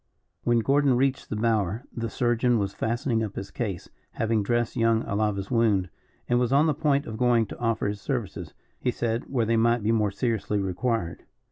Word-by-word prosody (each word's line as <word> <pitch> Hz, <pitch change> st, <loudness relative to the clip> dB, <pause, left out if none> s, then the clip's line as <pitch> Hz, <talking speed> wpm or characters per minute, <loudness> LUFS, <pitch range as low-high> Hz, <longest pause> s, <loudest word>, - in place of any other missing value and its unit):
When 120 Hz, -1 st, +3 dB
Gordon 140 Hz, +1 st, +3 dB
reached 135 Hz, +1 st, 0 dB
the -, -, -2 dB
bower 110 Hz, 0 st, 0 dB
the 115 Hz, -1 st, -3 dB
surgeon 120 Hz, 0 st, +1 dB
was 100 Hz, -2 st, -1 dB
fastening 115 Hz, 0 st, -1 dB
up 105 Hz, -2 st, -5 dB
his 100 Hz, -, -6 dB
case, 100 Hz, -8 st, -4 dB, 0.3 s
having 110 Hz, -1 st, 0 dB
dressed 120 Hz, +3 st, 0 dB
young 115 Hz, 0 st, +2 dB
Alava's 100 Hz, -1 st, -1 dB
wound, 105 Hz, -7 st, +2 dB, 0.4 s
and 120 Hz, 0 st, +2 dB
was 125 Hz, 0 st, +1 dB
on 140 Hz, +3 st, +5 dB
the 155 Hz, -, +2 dB
point 145 Hz, -1 st, +1 dB
of 110 Hz, -, -6 dB
going 120 Hz, -2 st, +3 dB
to -, -, -10 dB
offer 115 Hz, -2 st, 0 dB
his 100 Hz, 0 st, -4 dB
services, 120 Hz, -, -4 dB, 0.2 s
he -, -, 0 dB
said, 120 Hz, 0 st, -1 dB
where 125 Hz, -4 st, +1 dB
they 115 Hz, +1 st, +2 dB
might 115 Hz, 0 st, +2 dB
be 110 Hz, -, +2 dB
more 105 Hz, -2 st, +2 dB
seriously 105 Hz, 0 st, -1 dB
required. 95 Hz, 0 st, -2 dB
115 Hz, 195 wpm, -26 LUFS, 105-120 Hz, 0.4 s, on